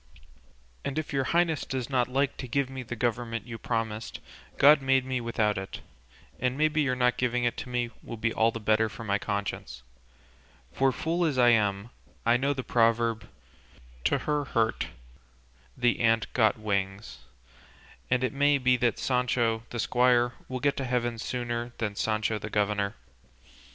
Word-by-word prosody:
And 140 +1 -3
if 155 -2 -3
your 135 -1 +1
highness 170 -1 +1
does 130 -2 -3
not 125 -3 +1
like 135 +2 0
to 130 - -6
give 135 +2 0
me 130 -1 -5
the 120 0 -6
government 115 -1 -2
you 115 -2 -7
promised, 115 -1 -3 0.4
God 145 +1 +7
made 135 -1 +2
me 130 -1 -2
without 110 -3 0
it, 95 0 -7 0.6
and 125 +1 0
maybe 155 0 +2
your 130 -3 +1
not 125 -1 +2
giving 125 -1 0
it 120 -1 +1
to - - -6
me 120 -1 -1
will 115 - -7
be 115 +1 0
all 110 +1 +3
the 115 - -5
better 110 +1 +2
for 115 +1 -9
my 100 -2 0
conscience, 100 - -4 0.9
for 135 0 +3
fool 165 +6 -1
as 150 -6 0
I 120 -1 +6
am 105 -1 +1 0.3
I 115 +1 +5
know 135 +3 +1
the 135 -2 -3
proverb 115 -1 +1 0.8
'to - - +3
her 150 -1 -1
hurt 115 -4 0 0.9
the 120 -2 +2
ant 115 -1 +2
got 110 -2 +3
wings,' 100 - -3 0.9
and 130 0 +2
it 130 - 0
may 145 +1 +3
be 130 -1 +3
that 120 -2 +1
Sancho 120 -3 +1
the 120 - -5
squire 120 +1 +3
will 130 0 -4
get 140 +2 +1
to 135 - -2
heaven 120 -2 -1
sooner 120 0 -3
than 105 -3 -2
Sancho 110 0 0
the 110 - -6
governor. 105 -1 0
120 Hz, 170 wpm, -28 LUFS, 110-130 Hz, 0.9 s, God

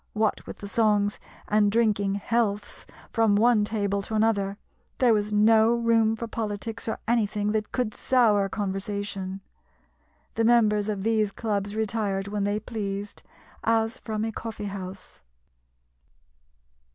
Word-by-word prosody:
What 215 -1 0
with - - -7
the 200 - -8
songs 205 -1 +1 0.3
and 210 -1 +3
drinking 205 -3 +2
healths 205 0 -2 0.3
from 225 -3 +3
one 225 0 +4
table 200 -2 -1
to 220 +2 -4
another, 205 -2 +1 0.4
there 245 -3 +4
was 210 0 0
no 220 +2 +5
room 230 -1 +2
for 230 - -5
politics 225 0 -4
or 220 - -1
anything 210 -3 +1
that 215 0 -2
could 245 -4 -1
sour 215 -6 +3
conversation. 195 -1 -4 0.9
The 225 - 0
members 215 -3 +3
of 200 -2 -3
these 215 -2 +1
clubs 205 -2 -2
retired 205 -3 -1
when 200 0 -2
they 205 +1 0
pleased, 205 -2 -5 0.4
as 225 0 +1
from 215 -1 -3
a 225 - -2
coffee 220 -1 -6
house. 190 -1 -8
210 Hz, 135 wpm, -26 LUFS, 200-225 Hz, 0.9 s, no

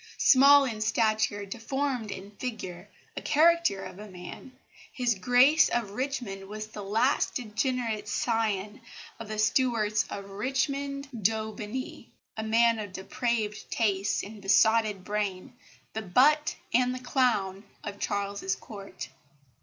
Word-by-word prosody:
Small 280 +1 +7
in 220 -4 -4
stature, 215 -2 +1
deformed 245 +2 -3
in 195 +1 -7
figure 205 -5 -6 0.3
a - - -4
caricature 330 - +3
of 185 - -9
a 210 - -8
man, 180 +7 -10 0.4
His 245 -4 +1
Grace 250 +9 +5
of 230 -4 -1
Richmond 220 -5 -4
was 215 +1 -6
the 210 - -8
last 225 +8 +1
degenerate 225 -2 -2
scion 215 -1 -1 0.4
of 225 - -7
the 215 0 -5
Stuarts 215 -1 +2
of 200 -1 -6
Richmond 275 +5 -2
d'Aubigny, 220 +2 -3 0.3
a 220 - -3
man 230 +1 +3
of 205 -3 -6
depraved 220 +1 -2
tastes 200 -3 0
and 210 0 -9
besotted 210 0 +3
brain, 205 -1 -3 0.4
the 220 - -3
butt 285 +10 +3 0.2
and 250 +1 +3
the - - -5
clown 235 -7 0 0.2
of 200 -1 -6
Charles's 200 -1 -2
Court. 195 -3 -9
220 Hz, 130 wpm, -28 LUFS, 205-250 Hz, 0.4 s, Small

